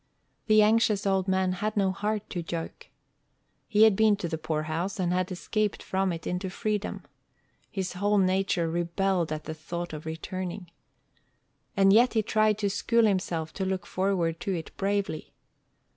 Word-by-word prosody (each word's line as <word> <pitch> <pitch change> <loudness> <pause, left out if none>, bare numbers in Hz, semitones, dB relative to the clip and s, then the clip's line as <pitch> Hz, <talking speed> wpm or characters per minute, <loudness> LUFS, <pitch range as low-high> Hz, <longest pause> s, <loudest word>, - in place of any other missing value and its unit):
The 215 -1 +6
anxious 215 -1 +3
old 190 -1 +1
man 190 -1 +2
had 210 +4 -2
no 195 -2 +3
heart 210 +2 -2
to 175 - -2
joke. 165 0 -6 0.8
He 210 +1 +4
had 220 -3 +6
been 215 0 +4
to 195 -4 -4
the 160 -1 -4
poorhouse, 160 +5 -2
and 180 -1 +1
had 185 +1 0
escaped 210 +3 -2
from 190 0 0
it 165 -1 -6
into 180 +1 -2
freedom. 210 +1 -3 0.7
His 190 -3 -3
whole 205 +3 +1
nature 185 -2 +2
rebelled 175 +1 0
at 155 0 -3
the 155 - -5
thought 170 +2 -6
of 155 +1 -7
returning. 180 +2 -5 1.1
And 195 0 +6
yet 240 +3 +5
he 220 - +3
tried 215 0 +2
to 205 -2 0
school 230 +3 +2
himself 175 -6 -1
to 195 - -3
look 190 -1 -2
forward 180 -4 0
to 195 0 -2
it 165 - -7
bravely. 200 -5 -2
190 Hz, 165 wpm, -28 LUFS, 170-205 Hz, 1.1 s, The